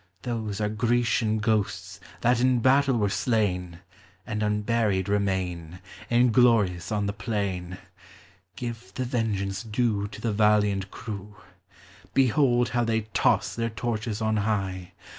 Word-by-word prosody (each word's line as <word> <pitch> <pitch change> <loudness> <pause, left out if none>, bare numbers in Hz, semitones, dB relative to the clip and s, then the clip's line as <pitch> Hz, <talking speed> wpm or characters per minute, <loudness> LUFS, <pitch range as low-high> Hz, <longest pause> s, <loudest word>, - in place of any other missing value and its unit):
Those 110 -4 -3
are 105 - +1
Grecian 110 0 +1
ghosts, 110 -1 -1 0.2
that 120 +1 +3
in 130 0 +3
battle 135 +1 +3
were 105 -2 +2
slain, 95 -5 -1 0.4
And 105 0 -3
unburied 105 -2 0
remain, 90 -4 -2 0.3
Inglorious 115 -7 +3
on 105 -1 0
the 100 - -2
plain: 95 -5 -3 0.8
(Jive 120 -5 -7
the 130 - -2
vengeance 105 -6 -1
due 110 -2 -1
To 115 - -10
the 115 -2 -1
valiant 105 -2 +2
eivw. 105 -1 -8 0.8
Behold 125 -2 +3
how 120 0 0
they 115 -1 +1
toss - - +2
their 115 0 -1
torches 110 0 -3
on 110 0 +1
high. 95 -4 -2
105 Hz, 125 wpm, -26 LUFS, 100-120 Hz, 0.8 s, that